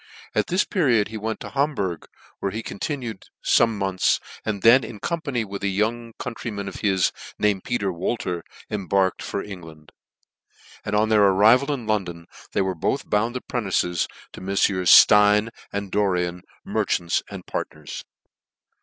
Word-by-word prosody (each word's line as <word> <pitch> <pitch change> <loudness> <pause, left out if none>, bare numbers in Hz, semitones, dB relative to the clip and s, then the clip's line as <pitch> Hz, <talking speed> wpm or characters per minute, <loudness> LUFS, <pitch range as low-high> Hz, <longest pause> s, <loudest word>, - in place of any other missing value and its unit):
At - - +1
this 180 +3 +2
period 125 - +2
he 110 - -6
wefit 110 +1 -4
to - - -6
Ham 140 +2 +1
burg, 90 -7 -3 0.3
where 100 - -2
he 110 +2 -4
continued 120 0 -5 0.2
fome 115 -1 +4
months, 95 -2 +1 0.2
and 105 -3 -3
then 120 +3 +7
in 110 - -8
company 140 - -2
with 100 0 -7
a 100 - 0
young 115 +4 -1
countryman 110 -4 -5
of 95 - -6
his, 95 -4 +2 0.3
named 105 -3 +1
Peter 100 -6 -1
Wolter, 90 -1 -2 0.3
embarked 95 -2 0
for 100 - -3
England: 80 -6 -11 0.9
and 105 - -2
oi) 105 +1 +4
their 110 -1 +4
arrival 110 +9 +5
in 130 -5 -3
London, 90 -6 -2 0.3
they - - +2
were 95 0 -1
both 85 - -2
bound 115 +4 +1
apprentices 95 -8 -1 0.3
to - - -10
Meffieurs 95 -1 +1
Stein 105 +2 +7 0.2
and 100 -1 -4
Loricn, 90 -3 0 0.2
merchants 85 -1 0
and - - -8
partners. 75 -2 -6
105 Hz, 155 wpm, -23 LUFS, 95-115 Hz, 0.9 s, then